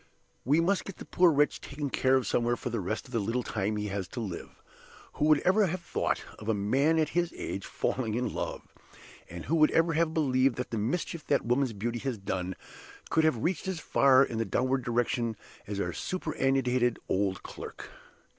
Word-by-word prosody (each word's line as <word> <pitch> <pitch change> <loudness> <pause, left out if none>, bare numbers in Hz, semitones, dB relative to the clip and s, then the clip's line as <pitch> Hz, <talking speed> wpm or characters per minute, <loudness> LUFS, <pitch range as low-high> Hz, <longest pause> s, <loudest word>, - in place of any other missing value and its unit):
We 145 +6 +3
must 185 +3 +1
get 195 - -8
the - - -9
poor 180 -1 +4
wretch 145 0 +2
taken 140 -1 -5
care 130 0 +3
of 130 - +2
somewhere 120 0 +1
for 125 - -4
the 115 - -1
rest 100 +4 -3
of 125 - -14
the 115 - 0
little 115 +5 -1
time 105 0 -1
he 105 0 -2
has 95 -2 -3
to 120 - -7
live. 100 -7 -6 0.5
Who 150 - 0
would 155 -2 +5
ever 195 +2 +4
have 185 +2 -2
thought - - -1 0.2
of 110 - -6
a 110 - +3
man 135 +11 +2
at 155 -2 +2
his 175 +1 0
age 95 - -4
falling 115 -4 -1
in 125 +1 -1
love? - - -4 0.6
And 85 0 -7
who 165 - +1
would 155 -1 +6
ever 165 0 +2
have 160 +1 +2
believed 135 -5 +2
that 125 - -4
the 115 - -1
mischief 155 +7 -2
that 140 - +2
woman's 125 +1 +1
beauty 115 +4 -3
has 130 -1 -3
done 95 -2 -3 0.6
could 160 - +3
have 125 -8 +1
reached 175 0 -1
as 190 -3 -2
far 135 -3 +5
in 115 -4 -3
the - - +2
downward 130 +6 0
direction 120 -1 0 0.3
as 100 0 -3
our 90 -3 -1
superannuated 135 -8 0
old 95 -1 0
clerk? - - -9
130 Hz, 205 wpm, -29 LUFS, 110-155 Hz, 0.6 s, would